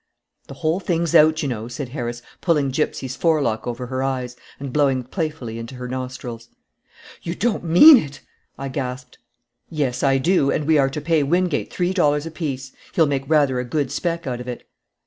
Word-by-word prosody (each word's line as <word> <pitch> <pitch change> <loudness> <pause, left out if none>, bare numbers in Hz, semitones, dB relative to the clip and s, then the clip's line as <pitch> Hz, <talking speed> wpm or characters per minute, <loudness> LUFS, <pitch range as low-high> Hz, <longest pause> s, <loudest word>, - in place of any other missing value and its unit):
"The 135 - -9
whole 160 +4 0
thing's 170 -4 -1
out, 155 +1 +5
you - - 0
know," 115 -3 -4
said 125 +2 -6
Harris, 120 -3 -5 0.2
pulling 150 -6 +1
Gypsy's 130 -2 -2
forelock 145 -7 +1
over 120 +1 -4
her 130 +1 -3
eyes 130 -2 -2 0.2
and 135 -2 -6
blowing 135 -3 +2
playfully 135 - -4
into 115 +3 -8
her 125 0 -6
nostrils. 125 -2 -6 0.7
"You 170 +1 -4
don't 220 -3 -1
mean 180 - +9
it!" 145 - -4 0.4
I 135 - -5
gasped. 130 -1 -5 0.5
"Yes, 135 -6 -1
I 135 -1 +3
do, 150 0 +2
and 150 - 0
we 155 -1 +4
are 135 -1 +3
to 150 +3 -5
pay 160 0 +2
Wingate 170 +2 0
three 180 +1 -1
dollars 150 -5 +2
apiece. 140 -5 -5 0.2
He'll 165 - +5
make 140 -2 -2
rather 145 -5 +3
a - - -1
good 140 +1 -2
spec 170 +3 -2
out 125 -2 -3
of 125 - -9
it." 125 - -7
140 Hz, 185 wpm, -22 LUFS, 125-160 Hz, 0.7 s, mean